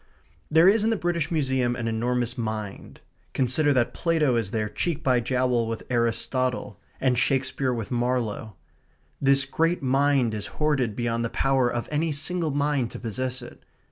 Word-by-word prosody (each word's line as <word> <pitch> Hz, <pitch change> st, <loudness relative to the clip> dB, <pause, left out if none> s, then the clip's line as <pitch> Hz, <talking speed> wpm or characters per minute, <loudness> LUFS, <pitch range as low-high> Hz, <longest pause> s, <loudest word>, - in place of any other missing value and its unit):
There 160 Hz, +3 st, +6 dB
is 210 Hz, +2 st, +5 dB
in 220 Hz, -, +2 dB
the 225 Hz, -, +2 dB
British 175 Hz, -5 st, -1 dB
Museum 130 Hz, -6 st, +1 dB
an 120 Hz, -2 st, -3 dB
enormous 120 Hz, +2 st, -1 dB
mind. 110 Hz, -4 st, -5 dB, 0.3 s
Consider 135 Hz, +3 st, +2 dB
that 120 Hz, -3 st, +1 dB
Plato 160 Hz, -6 st, +1 dB
is 115 Hz, -4 st, 0 dB
there 110 Hz, 0 st, -1 dB
cheek 160 Hz, +8 st, -2 dB
by 125 Hz, -2 st, +3 dB
jowl 125 Hz, -1 st, +1 dB
with 115 Hz, -1 st, -4 dB
Aristotle; 125 Hz, +2 st, -1 dB, 0.2 s
and 125 Hz, -2 st, +2 dB
Shakespeare 130 Hz, 0 st, 0 dB
with 115 Hz, -4 st, -4 dB
Marlowe. 120 Hz, -4 st, -1 dB, 0.7 s
This 140 Hz, 0 st, +4 dB
great 165 Hz, +4 st, 0 dB
mind 135 Hz, -2 st, +2 dB
is 105 Hz, -1 st, -4 dB
hoarded 140 Hz, -8 st, +1 dB
beyond 115 Hz, 0 st, -1 dB
the 115 Hz, -, -1 dB
power 135 Hz, -2 st, +1 dB
of 120 Hz, -1 st, -3 dB
any 155 Hz, +2 st, 0 dB
single 160 Hz, +3 st, -1 dB
mind 145 Hz, -3 st, 0 dB
to -, -, -8 dB
possess 125 Hz, +2 st, -3 dB
it. -, -, -12 dB
130 Hz, 165 wpm, -25 LUFS, 120-145 Hz, 0.7 s, There